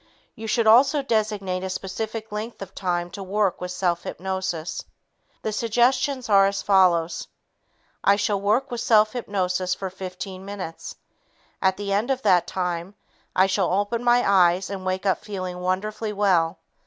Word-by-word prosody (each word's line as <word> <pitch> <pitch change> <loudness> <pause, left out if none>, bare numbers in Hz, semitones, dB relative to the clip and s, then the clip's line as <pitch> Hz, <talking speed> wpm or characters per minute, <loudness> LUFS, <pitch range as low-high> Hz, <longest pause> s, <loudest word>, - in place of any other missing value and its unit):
You 220 0 -8
should 230 +1 +1
also 265 +6 +5
designate 210 -6 -1
a 190 - -3
specific 215 +4 -5
length 215 0 -5
of 190 0 -12
time 175 -2 -2
to 200 - -7
work 195 0 0
with 180 - -4
self 180 -1 0
hypnosis. 190 -3 -4 0.6
The 220 - -1
suggestions 245 +4 +1
are 195 -2 +6
as 200 0 -2
follows: 175 -4 +3 0.8
"I 200 - +5
shall 205 -1 0
work 220 +7 +1
with 240 -1 -3
self 215 -1 +4
hypnosis 185 -6 -1
for 190 -1 -5
15 185 0 -7
minutes. 195 -5 -7 0.7
At 190 -1 +2
the 200 0 -2
end 210 +6 0
of 265 -1 -1
that 180 -2 +4
time, 180 +1 -3 0.4
I 185 - +5
shall 190 -1 +1
open 205 +5 0
my 245 0 +4
eyes 185 -1 +3
and 190 -1 -5
wake 185 +1 -2
up 190 - +1
feeling 185 -3 -5
wonderfully 210 +4 -2
well. 185 -4 +2
195 Hz, 160 wpm, -24 LUFS, 185-215 Hz, 0.8 s, are